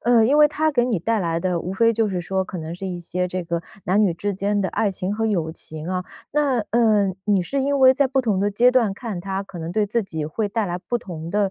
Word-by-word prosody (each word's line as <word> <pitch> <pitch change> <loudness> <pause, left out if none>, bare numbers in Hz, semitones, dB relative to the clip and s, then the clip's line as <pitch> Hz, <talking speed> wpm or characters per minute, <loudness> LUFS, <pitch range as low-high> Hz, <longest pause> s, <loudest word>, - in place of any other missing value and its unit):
呃， 235 -1 +5
因 280 +6 +3
为 300 - +8
它 310 +1 0
给 245 -4 +2
你 235 -6 0
带 225 +6 0
来 165 -3 -1
的 180 -1 0
无 180 +2 -4
非 230 +4 +3
就 225 -1 +1
是 185 -3 -2
说 190 +2 -1
可 185 - -7
能 160 0 -6
是 180 +3 -6
一 180 -2 -4
些 180 +1 -2
这 180 0 -3
个 170 0 -2 0.2
男 195 +4 +2
女 190 -6 +3
之 205 +4 -2
间 200 +2 0
的 190 - 0
爱 215 - 0
情 185 +1 -3
和 225 +2 -1
友 175 -7 0
情 160 0 -8
啊。 180 -1 -2 0.3
那 285 -4 +1
呃， 215 -4 +3
你 200 -3 +2
是 275 +9 -2
因 280 +1 0
为 260 0 +8
在 280 +1 +2
不 265 +1 +1
同 215 -6 0
的 200 +2 +2
阶 235 +5 +4
段 235 -6 +2
看 205 -5 -5
它 195 +1 -3
可 190 -2 -10
能 165 +1 -5
对 210 +2 +2
自 225 +2 -1
己 160 -5 -4
会 205 +8 -2
带 215 0 -1
来 175 0 -3
不 240 - -2
同 170 -7 -7
的， 205 +1 +1
200 Hz, 295 characters per minute, -22 LUFS, 180-230 Hz, 0.3 s, 为